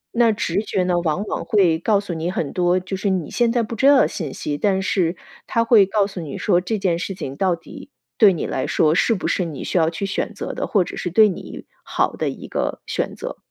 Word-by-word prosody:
那 235 -1 +4
直 200 -1 -1
觉 190 -4 -1
呢， 180 -1 +1
往 170 +3 -1
往 - - -3
会 175 -6 +2
告 205 +2 +2
诉 200 -3 -5
你 165 +1 -3
很 155 -6 -3
多， 180 0 +2
就 185 +1 -5
是 195 +1 -1
你 185 -5 -2
现 240 -1 +2
在 240 -1 +1
不 230 +1 -5
知 265 +5 +3
道 285 -1 +7
的 - - +3
信 155 -8 -5
息， 145 -1 -4
但 195 -2 +2
是 175 -3 0 0.3
它 230 - +1
会 225 -5 +5
告 200 0 +2
诉 195 -2 -7
你 150 -4 -6
说 180 -3 +2
这 215 +4 -2
件 180 -4 0
事 195 - -4
情 140 -7 -6
到 185 +1 +1
底 165 - -12 0.3
对 205 -3 +8
你 170 - -3
来 130 - -2
说 155 0 +2
是 225 +6 +2
不 185 - -3
是 185 - 0
你 155 -5 -6
需 - - -5
要 160 - +3
去 170 +4 -4
选 195 - -2
择 - - -5
的， - - -3
或 195 -4 +2
者 - - -8
是 175 - -3
对 215 +4 +5
你 180 - -8 0.2
好 - - 0
的 - - -2
一 - - -8
个 - - -3
选 - - -3
择。 - - -6
185 Hz, 275 characters per minute, -21 LUFS, 170-205 Hz, 0.3 s, 对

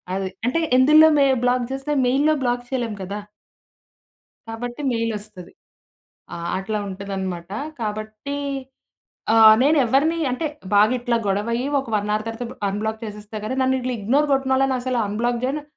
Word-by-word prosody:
అది 190 -1 -2 0.2
అంటే 255 +7 +1 0.2
ఎందులో 305 +4 +7
మే 280 - +5 0.2
బ్లాక్ 250 0 +2
చేస్తే 270 +2 -3
మెయిల్‌లో 290 +5 +3
బ్లాక్ 245 0 0
చేయలేము 235 -5 -3
కదా! 200 +3 -5 1.3
కాబట్టి 240 +3 -6
మెయిల్ 230 0 -1
ఒస్తది. 205 -4 -13 0.8
ఆ! - - -6 0.2
అట్లా 210 +3 -3
ఉంటదన్నమాట! 190 -2 -5 0.3
కాబట్టి, 215 +5 -4 1.0
ఆహ్, 220 -1 +9
నేనేవరిని 285 +3 +3
అంటే 255 +6 -2 0.3
బాగా 210 +4 +5
ఇట్లా 240 -1 0
గొడవ 200 +3 0
అయ్యి 245 +3 -1
ఒక 265 - -11
1 210 0 -2
అవర్ 215 +1 -2
తర్వాత 230 +2 -6
అన్‌బ్లాక్ 220 +3 -3
చేసేస్తా 210 0 -7
గాని 260 +5 -3
నన్నిట్లా 260 -1 0
ఇగ్నోర్ 270 +9 +1
గొట్టినోళ్ళని 270 0 +2
అసల 250 0 -2
అన్‌బ్లాక్ 235 +3 -1
జేయను. 280 +4 -1
235 Hz, 140 wpm, -22 LUFS, 210-265 Hz, 1.3 s, ఆహ్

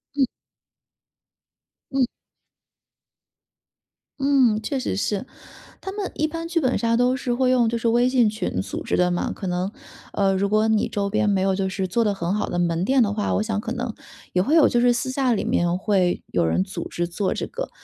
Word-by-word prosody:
嗯。 275 -2 +3 1.7
嗯。 270 -2 +2 2.1
嗯， 265 -6 +3
确 275 +6 -2
实 255 - -2
是。 205 +3 -1 0.6
他 385 - -6
们 405 -2 -4
一 310 - +1
般 330 +1 -5
剧 335 0 0
本 260 -5 +1
杀 230 0 +1
都 250 +1 +3
是 260 -2 -2
会 255 +1 +2
用 245 -3 +3
就 235 - -1
是 230 0 -1
微 240 +2 +3
信 245 -4 +3
群 215 - -3
组 95 - -5
织 - - -1
的 180 0 +3
嘛， 175 - -1
可 190 - -6
能， 180 +2 -1 0.4
呃， 195 -1 +2
如 200 +1 0
果 215 +1 +3
你 220 -1 +1
周 200 -1 -1
边 210 0 +1
没 200 -1 +2
有 190 0 +2
就 190 0 -1
是 190 0 -2
做 230 +6 +1
得 210 -2 +1
很 185 0 -2
好 210 - -2
的 175 - -2
门 170 0 0
店 260 +6 +3
的 210 -3 +2
话， 210 -1 -1
我 - - +1
想 215 -1 -2
可 225 - -5
能 245 -2 -3 0.4
也 180 - +3
会 280 - +2
有 320 - +7
就 240 - +2
是 245 0 +5
私 240 +2 -1
下 260 -1 +1
里 220 - -1
面 175 +1 +1
会 185 -3 +1
有 85 -2 +2
人 85 +3 +1
组 - - -6
织 175 0 -2
做 185 +3 -1
这 - - -4
个。 - - -5
215 Hz, 230 characters per minute, -23 LUFS, 190-255 Hz, 2.1 s, 有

